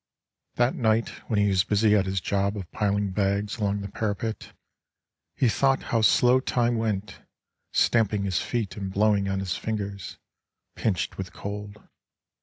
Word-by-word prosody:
That 120 +1 +2
night 110 -1 +1 0.2
when 110 - +1
he 105 0 +3
was 95 -2 +3
busy 105 +1 +3
at 95 -2 +2
his 95 0 0
job 100 +3 -1
Of 95 -4 -7
piling 100 -2 0
bags 100 +2 0
along 100 -2 -1
the 100 - -5
parapet, 110 +2 -3 0.8
He 130 - +2
thought 135 +4 +2
how 115 - +3
slow 125 +3 +5
time 120 -2 +1
went, 105 -2 -2 0.5
stamping 105 -3 +2
his 95 -3 0
feet 115 -5 -2
And 100 -2 -5
blowing 100 0 +2
on 95 0 -1
his 95 -2 -2
fingers, 100 -4 -4 0.6
pinched 100 -7 -1
with - - -5
cold. 105 +1 -7
105 Hz, 155 wpm, -26 LUFS, 100-110 Hz, 0.8 s, slow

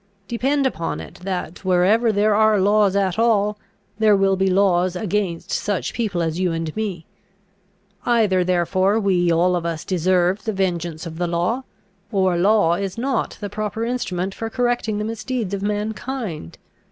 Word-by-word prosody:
Depend 270 +5 0
upon 165 -11 -2
it - - -10
that, 180 -2 -4
wherever 190 +6 +3
there 210 +1 +2
are 215 0 +4
laws 205 0 +3
at 195 0 +1
all, 210 -2 +2 0.4
there 215 -2 +5
will 195 0 +3
be 190 0 +1
laws 185 -1 +2
against 190 -3 -2
such 205 -3 -1
people 200 -7 -1
as 165 +1 -2
you 185 -2 +1
and 165 -1 -3
me. 195 -7 -3 1.0
Either 215 -6 +2
therefore 185 +3 +1
we 180 -4 +2
all 175 +2 +3
of 175 - -2
us 165 -2 -3
deserve 185 +1 +1
the 220 - -1
vengeance 175 -4 -2
of 165 0 -7
the 175 - 0
law, 180 +10 -1 0.5
or 190 -4 +2
law 190 -1 +3
is 190 +2 -3
not 260 0 -1
the 205 - -3
proper 215 +2 -3
instrument 195 -6 -2
for 225 +2 -5
correcting 240 -3 0
the 210 - -2
misdeeds 225 -2 -3
of 195 - -2
mankind. 210 - -4
195 Hz, 165 wpm, -21 LUFS, 180-215 Hz, 1.0 s, there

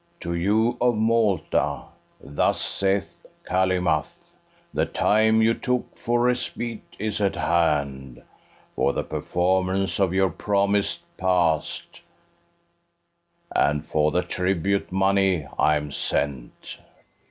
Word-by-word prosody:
To 85 - -3
you 110 +7 +1
of 120 -1 +3
Malta 105 - +1 0.4
thus 70 +2 0
saith 100 0 -1 0.2
Calymath: 90 -4 0 0.4
The - - 0
time 110 +1 +3
you 115 +1 +4
took 125 +1 -2
for 120 +1 0
respite 120 -2 -2
is 105 0 -2
at 100 -1 +1
hand 70 -7 -1 0.5
For 70 - +1
the - - -2
performance 95 +2 0
of 95 -3 +2
your 95 -1 +2
promise 100 +2 0 0.2
pass'd; 90 -4 0 1.6
And 75 +1 +1
for 75 -1 +1
the 90 +3 0
tribute 95 +2 -1
money 95 -3 +2
I 75 - +4
am 75 -1 -3
sent. 70 -3 -3
95 Hz, 105 wpm, -24 LUFS, 80-105 Hz, 1.6 s, you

